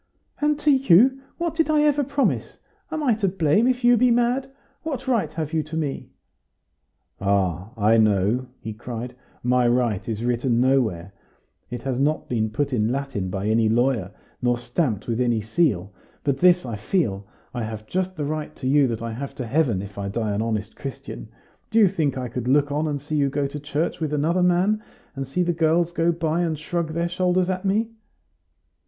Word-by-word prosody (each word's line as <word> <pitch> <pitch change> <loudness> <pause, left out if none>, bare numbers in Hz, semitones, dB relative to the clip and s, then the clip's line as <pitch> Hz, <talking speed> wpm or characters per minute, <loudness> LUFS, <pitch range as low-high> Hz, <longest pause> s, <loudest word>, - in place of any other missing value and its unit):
"And 295 0 +2
to 300 0 +3
you, 265 +1 +5 0.2
what 340 -2 -1
did 325 -1 +1
I 305 -1 +4
ever 295 -1 +3
promise? 280 +1 -1 0.3
Am 310 -1 -2
I 250 -5 +4
to 210 -2 0
blame 185 +4 +2
if 250 -1 0
you 240 0 +6
be 250 +2 +4
mad? 245 +3 +1 0.3
What 275 -5 -5
right 225 - +1
have 160 -1 -4
you 160 - +2
to 155 +2 -6
me?" 145 -4 -3 1.1
"Ah! 95 -1 0
I 110 +2 +4
know," 110 +3 +2
he 110 - -5
cried, 120 +2 -6 0.3
"my 125 0 +3
right 120 -4 +1
is 110 0 -3
written 120 0 +1
nowhere. 110 -9 +1 0.6
It 120 -1 -6
has 130 -2 -2
not 150 +3 0
been 110 -3 0
put 140 +6 -2
in 110 -1 +1
Latin 135 -8 -3
by 95 +2 -3
any 110 +1 +3
lawyer, 120 -4 +1 0.3
nor 120 -1 +2
stamped 120 - -1
with 120 +1 -1
any 120 -2 +2
seal. 110 - 0 0.3
But 140 -1 0
this 180 -3 +5
I 115 -4 -4
feel: 105 - -1 0.3
I 120 - -3
have 110 -1 -5
just 185 +6 -2
the 150 -3 -3
right 155 +1 -4
to 130 - -5
you 140 0 +4
that 115 -1 -3
I 115 -1 -4
have 135 +4 -6
to 125 - -4
heaven, 120 -7 +1
if 100 0 -9
I 100 0 -3
die 110 +1 -2
an 100 - -1
honest 110 -1 -2
Christian. 135 -4 -7 0.4
Do 220 - -1
you 215 -3 +7
think 155 -8 0
I 125 -1 -3
could 120 +1 -5
look 145 +2 +3
on 150 +2 0
and 145 -2 -2
see 150 +2 -3
you 140 -1 +2
go 140 +1 -1
to 140 +2 -5
church 145 +3 -2
with 155 -2 -2
another 160 +5 +1
man, 180 +4 +2 0.3
and 135 -1 -4
see 180 +7 0
the 175 0 0
girls 165 +1 +2
go 170 0 +2
by 165 0 -1
and 165 -3 -1
shrug 160 +1 -3
their 170 +1 0
shoulders 180 +1 +1
at 185 +1 -4
me?" 220 +4 +1
140 Hz, 200 wpm, -23 LUFS, 115-180 Hz, 1.1 s, you